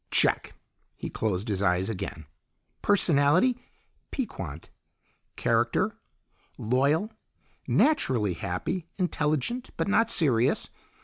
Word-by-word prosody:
"Check!" - - +2 0.4
He - - -6
closed 105 -1 -2
his 100 -3 -1
eyes 95 -1 +2
again. 90 -7 -5 0.6
"Personality, 180 - +4 0.5
piquant. 90 - -5 0.6
Character, - - +1 0.6
loyal, 140 - +1 0.6
naturally 125 - +2
happy, 100 - -3
intelligent, 180 - -1
but - - -1
not 225 +3 +3
serious. 130 - +2
140 Hz, 85 wpm, -27 LUFS, -, 0.6 s, Personality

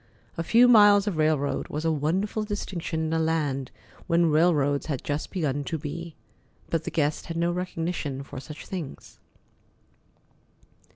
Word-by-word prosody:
A - - -2
few 230 +8 +5
miles 205 -4 +7
of 200 -6 -2
railroad 155 -2 +1
was 155 +2 -4
a 165 - +3
wonderful 185 +9 0
distinction 185 -6 -3
in 160 - -2
a 165 - +1
land 150 -5 0 0.4
where 170 - +3
railroads 150 -3 +2
had 140 -5 -3
just 145 +1 -3
begun 145 -6 -1
to 160 - -2
be. 160 +2 -6 0.6
But 165 -1 0
the - - -2
guest 150 -1 -1
had 165 - -4
no 170 +1 +1
recognition 165 -6 -3
for 135 - -8
such 150 +3 -10
things. 175 -7 -7
160 Hz, 155 wpm, -26 LUFS, 145-175 Hz, 0.6 s, miles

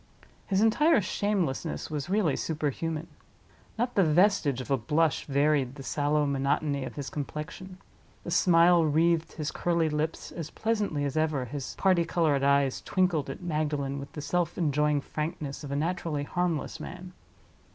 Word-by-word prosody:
His 195 0 +2
entire 275 +8 +4
shamelessness 180 - -2
was 150 +1 -3
really 195 -7 +2
super 155 -2 -1
human. 165 +2 -3 0.7
Not 245 +2 -1
the 195 - +4
vestige 160 - +3
of 130 - -6
a - - +5
blush 150 +6 +1
varied 140 -2 +1
the 135 - -9
sallow 145 +1 +1
monotony 140 +1 0
of - - -8
his 140 -2 -5
complexion; 150 +5 -6 0.5
the 175 - -5
smile 170 -1 +5
wreathed 160 +2 +2
his 155 -2 -3
curly 170 -2 +1
lips 150 +2 -3
as 165 -3 -6
pleasantly 210 -10 -1
as 140 - -3
ever 155 -5 +1
his 135 +2 -6
party 185 -3 +3
colored 165 -4 +1
eyes 140 -1 +2
twinkled 180 -6 0
at - - -7
Magdalen 150 -4 -1
with 140 - -8
the 150 - -6
self 175 +2 -1
enjoying 150 -2 +1
frankness 150 -1 -5
of 145 - -6
a - - -1
naturally 160 -1 -1
harmless 175 0 -2
man. 180 +1 -8
155 Hz, 160 wpm, -28 LUFS, 145-175 Hz, 0.7 s, a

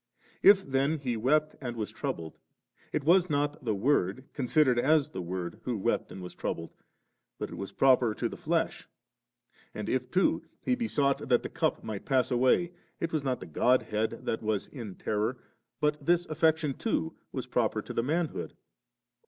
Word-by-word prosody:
If 195 -1 +7
then 140 +4 +1
He 130 -5 -2
wept 150 +7 +2
and 120 -3 -4
was 110 -2 -3
troubled, 80 -1 -5 0.5
it 150 - -1
was 175 +4 +4
not 145 0 0
the 110 -4 0
Word, 115 0 +1
considered 130 -1 +3
as 150 +2 +3
the 95 - -4
Word, 90 0 -4
who 125 -3 -2
wept 95 - -1
and 95 - -8
was 90 - -8
troubled, 85 0 -4 0.6
but - - -5
it - - -6
was 100 - -6
proper 125 -4 +4
to - - -1
the - - -7
flesh; - - -1 0.9
and - - -4
if 125 -1 -1
too 185 +7 +2 0.2
He 255 - 0
besought 145 - 0
that 120 -2 +4
the - - -4
cup - - -1
might 110 -3 -5
pass 130 -2 +2
away, 130 +8 +3 0.3
it 165 -1 -2
was 155 -3 0
not 130 -2 -1
the - - -6
Godhead 110 +4 +1
that 110 - -1
was 105 -2 -1
in 110 -8 -7
terror, 110 +4 -1 0.4
but 150 0 0
this 175 +3 +3
affection 160 -2 +2
too 80 -9 -1 0.2
was - - -4
proper - - 0
to - - -7
the - - +1
manhood. 160 +5 -2
130 Hz, 175 wpm, -29 LUFS, 110-150 Hz, 0.9 s, If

